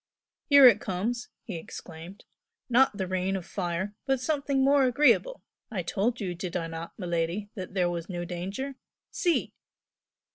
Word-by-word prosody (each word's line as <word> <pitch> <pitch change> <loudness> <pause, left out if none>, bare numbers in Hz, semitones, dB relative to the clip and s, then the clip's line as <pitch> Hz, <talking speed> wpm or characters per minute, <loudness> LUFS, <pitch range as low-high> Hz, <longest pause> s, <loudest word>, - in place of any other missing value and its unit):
"Here 280 -2 +9
it 240 - +5
comes!" 225 +6 -2
he 195 -7 -5
exclaimed 165 +3 -10 0.4
"Not 250 -3 +4
the 190 - -1
rain 185 +1 -1
of 185 -3 -4
fire, 185 +1 -3
but 270 -1 +2
something 275 0 0
more 280 -1 +5
agreeable! 295 - +3 0.3
I 190 -5 -3
told 225 +8 -1
you, 185 -5 -2
did 175 0 -4
I 165 - -3
not, 165 0 -7
miladi, 175 +2 -2
that 185 -1 -7
there 180 -2 +2
was 170 0 -4
no 175 -2 -4
danger? 195 +11 -5 0.3
See!" 345 -3 0
195 Hz, 155 wpm, -28 LUFS, 175-255 Hz, 0.4 s, Here